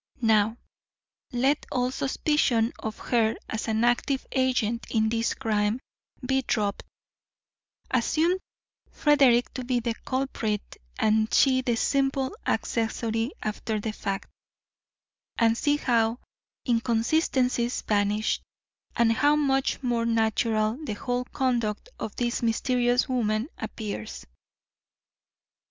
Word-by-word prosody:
Now, 220 0 +3 0.7
let 265 +4 +1
all 250 -1 0
suspicion 265 -4 +1
of 220 -1 -5
her 225 -2 +1
as 220 +1 -4
an 220 +1 +1
active 245 +3 +1
agent 250 -4 0
in 220 -1 +2
this 230 0 0
crime 210 +1 0 0.5
be 265 +1 +2
dropped, 210 -5 -1 1.1
assume 320 +9 +2 0.5
Frederick 270 -5 +3
to 255 - -4
be 250 0 0
the 235 0 -1
culprit 255 -6 -2 0.2
and 220 0 +2
she 260 -2 +4
the 245 -2 0
simple 270 - 0
accessory 225 +2 -1
after 215 0 -2
the 215 +1 -3
fact, 195 -2 -4 1.1
and 225 -1 +4
see 290 +5 +1
how 230 -4 +1 0.5
inconsistencies 245 +1 +1
vanish, 210 +1 +1 0.5
and 235 -1 +4
how 290 +5 +3
much 275 -2 +1
more 235 -2 0
natural 225 +2 +1
the 225 - -3
whole 245 +4 -2
conduct 240 - -1
of 210 - -5
this 240 0 -1
mysterious 245 +1 +1
woman 230 0 0
appears. 200 - -6
235 Hz, 110 wpm, -26 LUFS, 220-260 Hz, 1.1 s, she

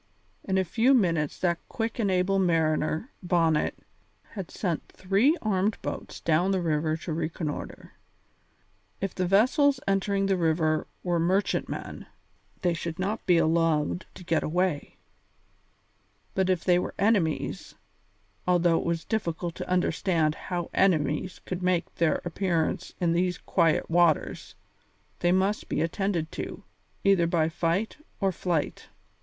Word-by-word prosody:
In 190 -1 0
a 190 - +3
few 235 +9 +3
minutes 165 - +1
that 170 -2 +1
quick 225 -2 -3
and 205 -4 +1
able 190 +1 +2
mariner, 160 - +1
Bonnet, 165 -4 +1 0.5
had 195 -5 -6
sent 175 -6 -3
three 200 - +2
armed 205 0 +1
boats - - -5
down 170 +3 +2
the 190 -1 +1
river 155 -2 0
to 165 0 -5
reconnoitre. 155 -1 -4 1.1
If 195 -2 -3
the 185 -1 -1
vessels 260 - +4
entering 195 0 +1
the 195 -1 +2
river 160 -2 +1 0.2
were 175 -2 +1
merchantmen, 185 +4 -1 0.6
they 175 -1 +2
should 170 -1 -4
not 205 +4 -2
be 175 -2 +5
allowed 165 0 +1
to 185 - -10
get 165 -2 +1
away; 175 -2 -1 1.4
but 190 -1 +1
if 185 -3 +1
they 180 -1 +4
were - - -4
enemies, 195 -6 0 0.7
although 175 -2 +3
it - - -5
was 170 -1 -1
difficult 175 -6 -2
to - - -7
understand 175 -3 +1
how 175 +1 -5
enemies 165 -1 +1
could 180 0 -4
make 180 -2 0
their 170 -2 +1
appearance 175 -1 -1
in 175 -2 +2
these 180 0 +1
quiet 165 -2 +1
waters, 170 -2 +1 0.6
they 175 - +2
must 190 +3 +1
be - - -1
attended 165 0 -1
to, - - -6 0.4
either 195 -4 +4
by 165 -2 +2
fight 170 +6 -1 0.2
or 195 -2 +2
flight. 175 -3 -2
175 Hz, 140 wpm, -27 LUFS, 165-195 Hz, 1.4 s, be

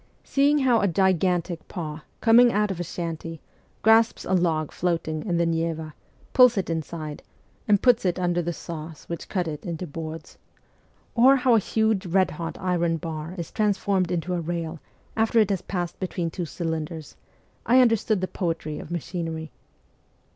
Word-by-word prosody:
Seeing 285 +2 +3
how 255 -5 +3
a 200 - +3
gigantic 180 -1 +1
paw, 155 -4 -6 0.2
coming 240 +1 +6
out 210 -1 +1
of 180 - -5
a - - -1
shanty, 165 -1 -5 0.4
grasps 225 +1 +4
a - - -1
log 165 -4 +1
floating 165 -3 -1
in 175 -4 0
the 170 - +2
Neva, 165 -1 -2 0.4
pulls 250 -3 +6
it 185 -3 -1
inside, 155 -1 -5 0.5
and 205 -2 +3
puts 245 -2 +5
it 180 -2 0
under 175 -1 +1
the 175 +1 -2
saws 160 -2 -8
which 170 - -6
cut 180 -4 -1
it 150 -2 -5
into 170 0 -4
boards; 160 0 -8 0.7
or 255 +3 +6
how 255 -2 +3
a 225 - +6
huge 220 -2 0
red 185 +2 +2
hot 165 +1 -5
iron 175 -2 0
bar 160 +1 -6
is 170 -2 -5
transformed 200 -3 +1
into 175 0 -2
a 175 - -1
rail 165 -1 -4 0.4
after 225 +1 +1
it 215 -2 +4
has 190 -3 -1
passed 175 -3 -4
between 175 -3 -2
two 175 +1 -4
cylinders, 160 -1 -4 0.5
I 250 +2 +6
understood 225 -4 +3
the 185 - -1
poetry 165 -5 -3
of - - -9
machinery. 165 -2 -4
175 Hz, 170 wpm, -25 LUFS, 165-200 Hz, 0.7 s, coming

